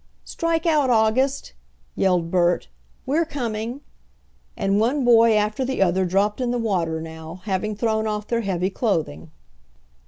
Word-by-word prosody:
"Strike 330 Hz, 0 st, -1 dB
out, 300 Hz, -5 st, +3 dB
August!" 245 Hz, +4 st, +1 dB, 0.4 s
yelled 180 Hz, -3 st, +1 dB
Bert. 175 Hz, -, +1 dB, 0.4 s
"We're 300 Hz, +6 st, +1 dB
coming," 240 Hz, -4 st, -4 dB, 0.8 s
and 195 Hz, +1 st, +1 dB
one 250 Hz, +5 st, +1 dB
boy 230 Hz, -2 st, +6 dB
after 210 Hz, +4 st, 0 dB
the 260 Hz, -6 st, +1 dB
other 185 Hz, +1 st, +1 dB
dropped 200 Hz, +6 st, 0 dB
in 250 Hz, -, 0 dB
the 245 Hz, -, 0 dB
water 180 Hz, -8 st, -1 dB
now, 160 Hz, +2 st, -9 dB
having 210 Hz, +1 st, -2 dB
thrown 220 Hz, 0 st, 0 dB
off 210 Hz, -1 st, -3 dB
their 235 Hz, +1 st, -1 dB
heavy 190 Hz, -2 st, -1 dB
clothing. 160 Hz, -, -2 dB
215 Hz, 145 wpm, -22 LUFS, 185-245 Hz, 0.8 s, boy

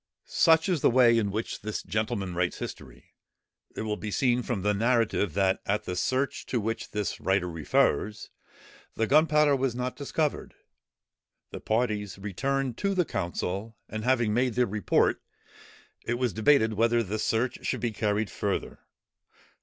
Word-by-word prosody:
Such 160 Hz, 0 st, +4 dB
is 175 Hz, -7 st, 0 dB
the -, -, +5 dB
way 120 Hz, -1 st, +5 dB
in 110 Hz, -3 st, +1 dB
which 110 Hz, +3 st, -4 dB
this 110 Hz, +1 st, -4 dB
gentleman 100 Hz, -1 st, -2 dB
writes 90 Hz, 0 st, -1 dB
history. -, -, -9 dB, 0.6 s
It -, -, -3 dB
will 105 Hz, -1 st, -2 dB
be 110 Hz, -, -5 dB
seen 125 Hz, +3 st, +1 dB
from 115 Hz, -6 st, -3 dB
the 105 Hz, 0 st, +2 dB
narrative, 110 Hz, -4 st, +1 dB
that 95 Hz, -1 st, +2 dB
at 105 Hz, +2 st, 0 dB
the 90 Hz, -, -4 dB
search 130 Hz, +9 st, -1 dB
to 125 Hz, -, 0 dB
which 115 Hz, +1 st, -3 dB
this 105 Hz, -1 st, -3 dB
writer 95 Hz, -1 st, +1 dB
refers, 85 Hz, +5 st, 0 dB, 0.6 s
the 115 Hz, -, +1 dB
gunpowder 150 Hz, +2 st, +4 dB
was 130 Hz, -2 st, -1 dB
not 125 Hz, +1 st, -3 dB
discovered. 150 Hz, +1 st, -2 dB, 1.0 s
The -, -, -6 dB
parties 105 Hz, -4 st, -1 dB
returned 130 Hz, +6 st, -2 dB
to 200 Hz, 0 st, 0 dB
the 180 Hz, -2 st, +2 dB
council, 100 Hz, -, -4 dB
and 110 Hz, 0 st, -5 dB
having 120 Hz, -3 st, +2 dB
made 125 Hz, 0 st, +1 dB
their 125 Hz, 0 st, +3 dB
report, 105 Hz, -3 st, +1 dB, 0.8 s
it 120 Hz, -, -1 dB
was 125 Hz, -2 st, -1 dB
debated 110 Hz, -1 st, +3 dB
whether 115 Hz, +2 st, +2 dB
the 110 Hz, +1 st, -4 dB
search 115 Hz, +3 st, -1 dB
should -, -, -1 dB
be 120 Hz, -, 0 dB
carried 105 Hz, -1 st, -1 dB
further. -, -, -3 dB
110 Hz, 160 wpm, -27 LUFS, 105-125 Hz, 1.0 s, the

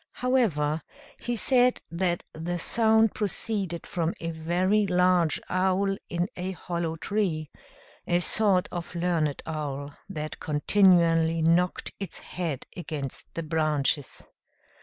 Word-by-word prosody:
However, 170 Hz, -, +1 dB, 0.4 s
he 240 Hz, -, -2 dB
said 250 Hz, +2 st, +3 dB
that 175 Hz, 0 st, 0 dB
the 170 Hz, +3 st, -3 dB
sound 220 Hz, +3 st, +3 dB
proceeded 200 Hz, -4 st, -2 dB
from 170 Hz, -1 st, -1 dB
a 165 Hz, 0 st, -3 dB
very 180 Hz, +6 st, +1 dB
large 180 Hz, -2 st, +3 dB
owl, 190 Hz, +1 st, +1 dB
in 175 Hz, +1 st, 0 dB
a 185 Hz, +1 st, -3 dB
hollow 170 Hz, -2 st, -3 dB
tree; 165 Hz, -4 st, -1 dB, 0.6 s
a 175 Hz, -, +3 dB
sort 190 Hz, 0 st, +2 dB
of 175 Hz, 0 st, -6 dB
learned 170 Hz, -4 st, 0 dB
owl, 145 Hz, -2 st, -4 dB
that 155 Hz, -4 st, -5 dB
continually 165 Hz, 0 st, +3 dB
knocked 175 Hz, +2 st, +2 dB
its 195 Hz, -4 st, -5 dB
head 165 Hz, -7 st, -4 dB
against 150 Hz, -6 st, -6 dB
the 165 Hz, -, -2 dB
branches. 150 Hz, -3 st, -1 dB
175 Hz, 115 wpm, -27 LUFS, 160-190 Hz, 0.6 s, said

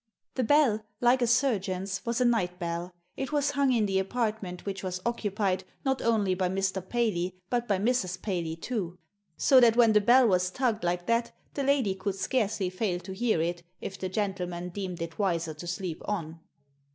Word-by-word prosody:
The 255 Hz, -, 0 dB
bell, 250 Hz, -5 st, +3 dB, 0.2 s
like 245 Hz, +1 st, +4 dB
a 240 Hz, -, +3 dB
suigeon's, 195 Hz, -7 st, 0 dB
was 235 Hz, +1 st, 0 dB
a 250 Hz, -, +3 dB
night 185 Hz, -7 st, +1 dB
belL 170 Hz, 0 st, -3 dB, 0.2 s
It 270 Hz, -, -4 dB
was 290 Hz, -1 st, +1 dB
hung 280 Hz, -2 st, +2 dB
in 230 Hz, -4 st, +3 dB
the 195 Hz, -1 st, +1 dB
apartment 210 Hz, -3 st, -2 dB
which 195 Hz, -1 st, -4 dB
was 185 Hz, -1 st, -3 dB
occupied, 205 Hz, -5 st, 0 dB, 0.2 s
not 265 Hz, -1 st, +1 dB
only 215 Hz, -5 st, +2 dB
by 185 Hz, 0 st, 0 dB
Mr. 190 Hz, 0 st, -1 dB
Paley, 185 Hz, -7 st, 0 dB, 0.2 s
but 240 Hz, -1 st, 0 dB
by 200 Hz, -3 st, +2 dB
Mrs. 190 Hz, -4 st, 0 dB
Paley 175 Hz, -5 st, -2 dB
too. 180 Hz, -1 st, -4 dB, 0.4 s
So 265 Hz, -, +6 dB
that 235 Hz, -2 st, +6 dB
when 235 Hz, -2 st, +5 dB
the 210 Hz, -, +5 dB
bell 245 Hz, +4 st, +6 dB
was 185 Hz, -2 st, +2 dB
tugged 230 Hz, 0 st, -1 dB
like 175 Hz, 0 st, -1 dB
that 230 Hz, +2 st, +1 dB, 0.2 s
the 280 Hz, -, -2 dB
lady 270 Hz, -7 st, +2 dB
could 190 Hz, 0 st, -3 dB
scarcely 200 Hz, -3 st, 0 dB
fail 185 Hz, -2 st, -1 dB
to 190 Hz, +2 st, -7 dB
hear 215 Hz, -5 st, +1 dB
it, 175 Hz, +1 st, -2 dB, 0.2 s
if 190 Hz, -, -6 dB
the 185 Hz, -, -3 dB
gentleman 180 Hz, -3 st, -2 dB
deemed 180 Hz, -2 st, -4 dB
it 165 Hz, +3 st, -8 dB
wiser 170 Hz, -5 st, 0 dB
to 155 Hz, +3 st, -9 dB
sleep 175 Hz, -1 st, -4 dB
on. 165 Hz, -6 st, -3 dB
195 Hz, 190 wpm, -28 LUFS, 180-235 Hz, 0.4 s, So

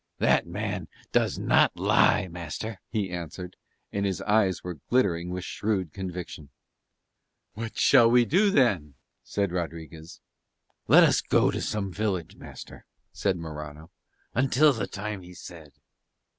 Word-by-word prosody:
"That -, -, +2 dB
man -, -, -4 dB, 0.2 s
does -, -, +1 dB
not -, -, +3 dB
lie, 95 Hz, -, +3 dB
master," 90 Hz, +5 st, -6 dB
he 105 Hz, -5 st, -2 dB
answered: 90 Hz, +1 st, -7 dB, 0.4 s
and 100 Hz, -, -2 dB
his 95 Hz, -2 st, -1 dB
eyes 105 Hz, -4 st, +2 dB
were 90 Hz, -4 st, -6 dB
glittering 90 Hz, -9 st, +1 dB
with 90 Hz, 0 st, -4 dB
shrewd 95 Hz, -8 st, -2 dB
conviction. 90 Hz, -6 st, -7 dB, 1.0 s
"What 115 Hz, +1 st, -6 dB
shall 115 Hz, -, +6 dB
we 120 Hz, 0 st, +5 dB
do 195 Hz, -, +3 dB
then?" 100 Hz, -, +2 dB, 0.3 s
said 100 Hz, -3 st, -2 dB
Rodriguez. 80 Hz, -2 st, -6 dB, 0.7 s
"Let -, -, +8 dB
us -, -, +4 dB
go -, -, +2 dB
to -, -, -3 dB
some 100 Hz, -3 st, -3 dB
village, 95 Hz, -4 st, -2 dB
master," -, -, -12 dB, 0.2 s
said 95 Hz, -3 st, -1 dB
Morano, 75 Hz, 0 st, -8 dB, 0.4 s
"until 135 Hz, +4 st, +4 dB
the 110 Hz, -5 st, -3 dB
time 105 Hz, 0 st, -5 dB
he 90 Hz, 0 st, -13 dB
said." 80 Hz, -5 st, -12 dB
95 Hz, 135 wpm, -27 LUFS, 85-105 Hz, 1.0 s, Let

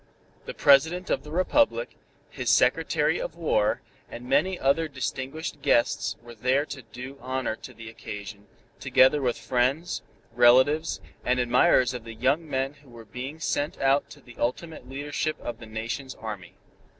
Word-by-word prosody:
The -, -, -7 dB
President 160 Hz, +6 st, +4 dB
of -, -, +1 dB
the 150 Hz, -, -11 dB
Republic, 285 Hz, -, +1 dB, 0.4 s
his -, -, -3 dB
Secretary -, -, +3 dB
of -, -, -5 dB
War -, -, +1 dB, 0.3 s
and 120 Hz, +1 st, -9 dB
many 155 Hz, +8 st, +2 dB
other 150 Hz, +4 st, +2 dB
distinguished 140 Hz, +2 st, -5 dB
guests 120 Hz, -3 st, +2 dB
were 120 Hz, 0 st, -11 dB
there 130 Hz, +5 st, +1 dB
to 140 Hz, -3 st, -8 dB
do 125 Hz, +4 st, -10 dB
honor 130 Hz, -2 st, -2 dB
to -, -, -10 dB
the 115 Hz, -1 st, -11 dB
occasion, 105 Hz, -2 st, -8 dB, 0.3 s
together 130 Hz, +3 st, +4 dB
with 125 Hz, -3 st, 0 dB
friends, 125 Hz, +8 st, 0 dB, 0.3 s
relatives 130 Hz, +6 st, +4 dB, 0.2 s
and 125 Hz, 0 st, +1 dB
admirers 125 Hz, 0 st, +4 dB
of 125 Hz, -2 st, -6 dB
the 115 Hz, -1 st, -9 dB
young 140 Hz, +7 st, +1 dB
men 135 Hz, 0 st, -1 dB
who 140 Hz, -, -20 dB
were 115 Hz, -1 st, -12 dB
being 130 Hz, +8 st, -7 dB
sent 150 Hz, -1 st, -2 dB
out 135 Hz, +1 st, +2 dB
to 145 Hz, -, -13 dB
the 120 Hz, -2 st, -16 dB
ultimate 130 Hz, +2 st, -3 dB
leadership 145 Hz, +3 st, -3 dB
of 120 Hz, -1 st, -6 dB
the 115 Hz, -, -10 dB
Nation's 115 Hz, +5 st, -5 dB
Army. 105 Hz, -6 st, -8 dB
130 Hz, 160 wpm, -26 LUFS, 120-150 Hz, 0.4 s, President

